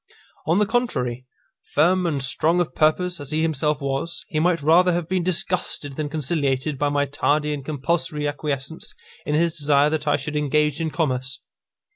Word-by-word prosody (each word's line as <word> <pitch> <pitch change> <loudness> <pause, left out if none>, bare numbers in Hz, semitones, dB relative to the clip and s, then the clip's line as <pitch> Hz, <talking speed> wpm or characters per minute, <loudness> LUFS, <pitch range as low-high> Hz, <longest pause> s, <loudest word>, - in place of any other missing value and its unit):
On 165 +3 +3
the 210 - +4
contrary, 130 - -1 0.5
firm 180 +2 +3
and 145 -5 -1
strong 160 +6 +2
of 175 - -1
purpose 175 +3 +1
as 145 -2 -7
he 155 +1 0
himself 150 -2 0
was, 140 +5 -3
he 155 - -1
might 165 -2 +1
rather 175 +4 +5
have 170 -2 -2
been 185 0 0
disgusted 170 -5 -2
than 150 0 -3
conciliated 145 -2 -1
by 145 - +2
my 145 0 +1
tardy 150 +1 0
and 140 -2 -5
compulsory 150 +1 -1
acquiescence 145 +1 -4 0.3
in 150 - +1
his 165 +1 +2
desire 145 -1 +3
that 155 -1 -2
I 145 - +3
should 150 +2 -5
engage 150 +1 +1
in 160 - 0
commerce. 130 -5 -1
150 Hz, 175 wpm, -23 LUFS, 145-170 Hz, 0.5 s, rather